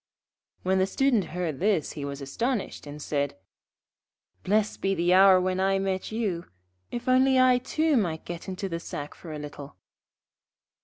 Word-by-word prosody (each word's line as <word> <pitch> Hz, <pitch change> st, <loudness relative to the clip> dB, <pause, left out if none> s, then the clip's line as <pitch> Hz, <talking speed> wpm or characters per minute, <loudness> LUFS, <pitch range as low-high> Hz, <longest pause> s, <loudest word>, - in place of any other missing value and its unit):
When 190 Hz, +1 st, +2 dB
the 190 Hz, -, +2 dB
Student 245 Hz, -2 st, +2 dB
heard 170 Hz, -4 st, -3 dB
this 195 Hz, -6 st, +1 dB
he 145 Hz, -, -6 dB
was 140 Hz, 0 st, -6 dB
astonished, 220 Hz, -, -3 dB
and 145 Hz, +1 st, -8 dB
said: 145 Hz, -6 st, -2 dB, 1.0 s
'Blessed 210 Hz, +2 st, 0 dB
be 195 Hz, 0 st, +1 dB
the 175 Hz, +1 st, +2 dB
hour 190 Hz, 0 st, +7 dB
when 185 Hz, 0 st, 0 dB
I 195 Hz, +1 st, +2 dB
met 195 Hz, 0 st, -2 dB
you, 205 Hz, -7 st, -2 dB, 0.4 s
if 240 Hz, -, -6 dB
only 260 Hz, +1 st, +4 dB
I 255 Hz, -1 st, +5 dB
too 310 Hz, +4 st, +1 dB
might 170 Hz, -7 st, -1 dB
get 170 Hz, +1 st, -7 dB
into 190 Hz, +1 st, -4 dB
the 165 Hz, -2 st, -3 dB
sack 145 Hz, -3 st, -6 dB
for 165 Hz, -, -10 dB
a 155 Hz, -, -5 dB
little.' 145 Hz, -3 st, -9 dB
185 Hz, 165 wpm, -27 LUFS, 160-215 Hz, 1.0 s, hour